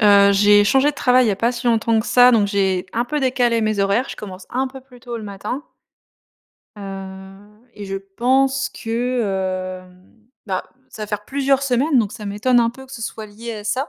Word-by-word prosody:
Heu, 200 -2 +6
j'ai 205 +1 +5
changé 270 +7 +3
de - - -13
travail 255 -2 +3
il - - +2
y - - +3
a - - 0
pas 230 +3 +1
si 240 0 -5
longtemps 230 -1 +2
que 220 - -2
ça, 250 0 +6
donc 215 -4 +3
j'ai 190 -2 0
un 235 +2 0
peu 300 +4 -2
décalé 245 -3 +1
mes 215 -2 0
horaires. 200 +6 +1
Je - - -6
commence 190 -2 -9
un 260 +1 -1
peu 265 0 -11
plus 250 -2 -18
tôt 240 -1 -6
le 220 - -7
matin. 210 +8 -5 1.1
Heu, 195 +3 -10
et 205 -1 -8
je 195 0 -4
pense 260 +7 +1
que, 195 -6 -2
hem, 185 +5 -22 0.2
bah, 185 -2 -2 0.2
ça 215 - -9
va - - -4
faire 210 0 -4
plusieurs 275 0 +1
semaines, 270 +2 +2
donc 210 -3 0
ça 215 -4 -8
m'étonne 240 +5 +2
un 230 0 +2
peu 265 +2 -13
que 265 - -15
ce 230 - -7
soit 220 0 -6
lié 230 +3 -8
à 210 -1 -8
ça. 255 +7 -1
220 Hz, 220 wpm, -20 LUFS, 200-250 Hz, 1.1 s, Heu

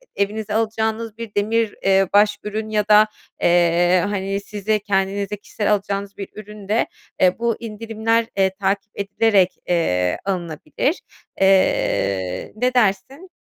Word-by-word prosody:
e 200 - +3
evinize 210 +1 -5
alacağınız 220 0 -1
bir 230 -3 -8
demir, 220 +1 0
eee, 195 0 +4
baş 205 0 +4
ürün 215 +1 -4
ya 210 -1 0
da, 210 0 +6 0.3
eee, 175 +1 +3
hani 195 -1 -2
size, 210 +1 -2
kendinize 200 0 -1
kişisel 210 +1 -2
alacağınız 200 0 -3
bir 195 - -6
ürün 210 -1 -10
de, 215 +3 +1 0.3
eee, 185 +2 +3
bu 235 -1 +1
indirimler, 225 0 -1
eee, 190 -1 +4
takip 195 +1 -1
edilerek, 200 -1 +2
eee, 90 - +1
alınabilir. 180 - -2 0.4
Eee, 100 - +1
ne 250 +3 0
dersin? 255 - 0
205 Hz, 135 wpm, -21 LUFS, 190-220 Hz, 0.4 s, da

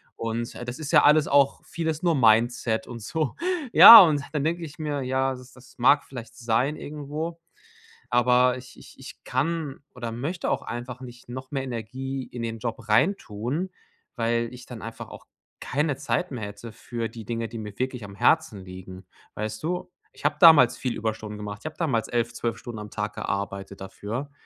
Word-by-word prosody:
Und, 115 +1 -4
äh, 120 - -7
das 120 +1 -6
ist 155 0 -5
ja 150 -3 +6
alles 150 0 +5
auch 140 -1 +3
vieles 160 0 -3
nur 170 -3 +3
Mindset 115 -1 +3
und 115 -2 -8
so. 155 +5 -2 0.4
Ja, 230 - +13
und 150 -5 +3
dann 145 -2 -1
denke 170 +2 -1
ich 150 0 -9
mir: 145 -2 -2
„Ja, 130 +1 0
das 125 0 -13
das 125 0 -18
mag 140 +4 +5
vielleicht 115 -3 -10
sein 120 +5 0
irgendwo, 150 +3 -6 0.7
aber 125 +1 +3
ich 125 0 -13
ich - - -15
ich 135 - -12
kann 145 +1 -2
oder 120 -2 -5
möchte 150 +9 -3
auch - - 0
einfach 125 +1 -6
nicht 120 -1 -11
noch 130 +2 -8
mehr 135 -2 -2
Energie 130 +2 -5
in 120 -1 -7
den 115 -1 -4
Job 115 -1 -5
reintun, 135 - 0 0.4
weil 115 0 0
ich 125 0 -11
dann 120 -4 -9
einfach 115 +1 -8
auch - - -12 0.3
keine 145 0 -1
Zeit 150 +3 -2
mehr 115 -5 -4
hätte 105 +3 -9
für 115 +1 -5
die 115 -2 -10
Dinge, 115 +1 -3
die 115 - -8
mir 105 -2 -8
wirklich 125 -4 -3
am 100 0 -11
Herzen 110 -5 +2
liegen.“ 95 0 -10 0.3
Weißt 110 +1 -4
du, 180 +2 -3 0.2
ich - - -16
habe 145 0 +2
damals 160 -8 +7
viel 125 -2 -3
Überstunden 110 -1 -4
gemacht. 105 -1 -6
Ich - - -25
hab 155 - -8
damals 135 -10 0
11, 120 0 -1
12 115 -1 -3
Stunden 115 -3 -8
am 105 0 -8
Tag 105 0 -4
gearbeitet 100 0 -4
dafür, 115 +8 -6
125 Hz, 190 wpm, -25 LUFS, 115-145 Hz, 0.7 s, Ja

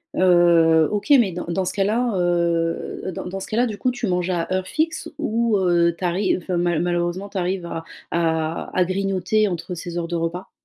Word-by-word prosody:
Heu, 170 -3 +5
OK 210 +5 -3
mais 210 -6 +2
dans 175 +1 -5
dans 185 +2 -1
ce - - -2
cas 195 - +1
là, 230 +4 +1
heu, 170 0 0
dans - - -5
dans 190 +2 -5
ce 195 - -7
cas-là, 235 +3 +1
du 215 -4 -4
coup, 255 - +1
tu 245 -1 -4
manges 180 -1 0
à 175 -2 -1
heure 185 0 -1
fixe 320 +1 -2
ou 235 -6 +1
heu, 170 -2 +2
tu - - -9
arrives 185 +3 +1
enfin 180 0 -2
malheu 175 -2 +1
malheureusement 175 +2 -1
tu 200 - -6
arrives 180 0 -2
à 165 -1 -5 0.3
à 160 -1 -1
à 185 - +4
grignoter 195 +2 0
entre 180 0 -4
ces 175 0 -6
heures 170 -1 -2
de 170 - -3
repas? 170 +2 -3
180 Hz, 215 wpm, -22 LUFS, 170-195 Hz, 0.3 s, Heu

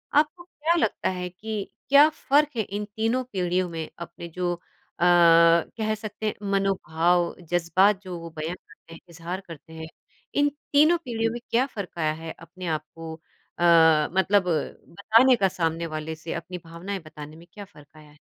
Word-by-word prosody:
आपको 310 +4 +2
क्या 335 -2 -1
लगता 225 - 0
है 180 -1 -3
कि 210 +3 -5 0.3
क्या 285 +2 +8
फ़र्क 295 -1 +2
है - - +2
इन 205 +2 -5
तीनों 225 +4 0
पीढ़ियों 180 -1 0
में? 165 -1 -5
अपने 170 0 -8
जो 175 +1 -2
अ, 175 0 -10
कह 170 +5 +5
सकते 215 0 -7
हैं 215 - 0 0.2
मनोभाव 175 -3 +1 0.2
जज़्बात 185 +4 +3
जो 185 -3 -7
वो 165 0 -8
बयान 160 +3 -3
करते 165 - -18
हैं 165 - -11
इज़हार 170 +3 -6
करते 160 0 -12
हैं। 160 0 -7 0.5
इन 290 0 +3 0.2
तीनों 310 +4 +6
पीढ़ियों 225 -2 -1
में 240 - -5
क्या 245 +3 +3
फ़र्क 200 -9 -8
आया 155 -1 +1
है 165 - -6
अपने 175 +2 -9
आप 155 - -18
को 165 -1 -7 0.5
अ, - - 0 0.5
मतलब 190 +1 +3 0.5
बताने 225 +7 +4
का 195 -4 +2
सामने 165 -2 -2
वाले 155 0 -5
से 160 +1 -6
अपनी 180 0 -6
भावनाएँ 180 +4 -6
बताने 150 0 -10
में 170 +1 -15
क्या 205 -1 -9
फ़र्क 150 -7 -18
आया 150 -1 -15
है? 150 - -21
180 Hz, 175 wpm, -25 LUFS, 165-215 Hz, 0.5 s, क्या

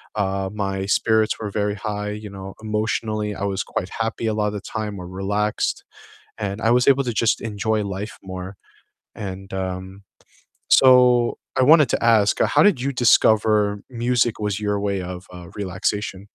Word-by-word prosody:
uh, 95 -2 -1
my 95 -2 -2
spirits 110 +2 +2
were 105 -2 -5
very 105 0 -1
high, 105 0 -4
you 105 0 -7
know, 95 -1 -9
emotionally, 110 -1 -2
I - - -5
was 100 -1 -1
quite 90 - -4
happy 115 0 -2
a 110 - 0
lot 105 -1 0
of 105 - -3
the 105 - -5
time 105 -1 -5
or 90 - -8
relaxed, 100 +3 -2 0.5
and 100 0 -4
I 115 - +2
was 125 +1 +3
able 140 0 +5
to 120 - -2
just 115 +2 +1
enjoy 110 0 -1
life 100 +2 -5
more 95 0 -7 0.6
and, 95 -1 -7
um, 95 +1 -5 0.7
so 125 -2 +5 0.2
I 130 - +3
wanted 150 0 +6
to - - 0
ask, 110 -3 +4
how - - +4
did 205 -11 +4
you 140 +2 -1
discover 110 -4 +3
music 120 -1 0
was 105 -1 -2
your 105 -1 -1
way 100 -2 -1
of, 90 +1 -7
uh, 90 0 -10
relaxation? 100 0 -3
105 Hz, 175 wpm, -22 LUFS, 95-110 Hz, 0.7 s, wanted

